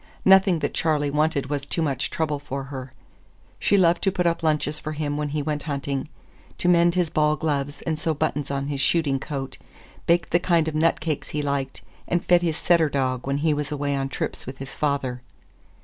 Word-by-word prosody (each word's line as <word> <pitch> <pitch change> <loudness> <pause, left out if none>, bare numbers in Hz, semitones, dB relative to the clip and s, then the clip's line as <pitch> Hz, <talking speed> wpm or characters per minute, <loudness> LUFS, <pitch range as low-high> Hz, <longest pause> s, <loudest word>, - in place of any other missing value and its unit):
Nothing 190 -2 +6
that - - -2
Charley 150 -3 +1
wanted 150 -2 0
was 145 -1 -1
too 165 +4 -1
much 140 -3 -1
trouble 150 -3 -1
for 140 -1 -5
her. 135 -1 -7 0.7
She 200 - +3
loved 175 -2 +4
to 195 - +2
put 180 -1 -1
up 170 0 +1
lunches 150 -1 0
for 155 +1 -5
him 145 -1 -2
when 150 0 -2
he 150 0 -2
went 150 0 -2
hunting, 140 -1 -3 0.5
to - - -1
mend 170 0 +5
his 175 -3 +1
ball 150 0 +3
gloves 145 -2 -2
and 160 -2 -2
sew 160 0 0
buttons 145 -1 -1
on 140 0 -2
his 140 -1 -2
shooting 145 -4 +2
coat, 135 -1 -5 0.5
baked 170 +1 +2
the 175 - +4
kind 170 -3 +2
of 160 - -2
nut 160 +2 +2
cake 155 -2 -2
he 150 -1 -3
liked, 140 -2 -2 0.2
and 175 0 0
fed 175 -1 +5
his 165 -3 -1
setter 170 -3 +3
dog 130 -2 -1
when 140 0 0
he 155 - +4
was 150 0 -3
away 145 -1 -1
on 135 0 -2
trips - - -4
with 130 +1 -6
his 135 0 -8
father. 140 -4 -1
150 Hz, 210 wpm, -24 LUFS, 140-165 Hz, 0.7 s, Nothing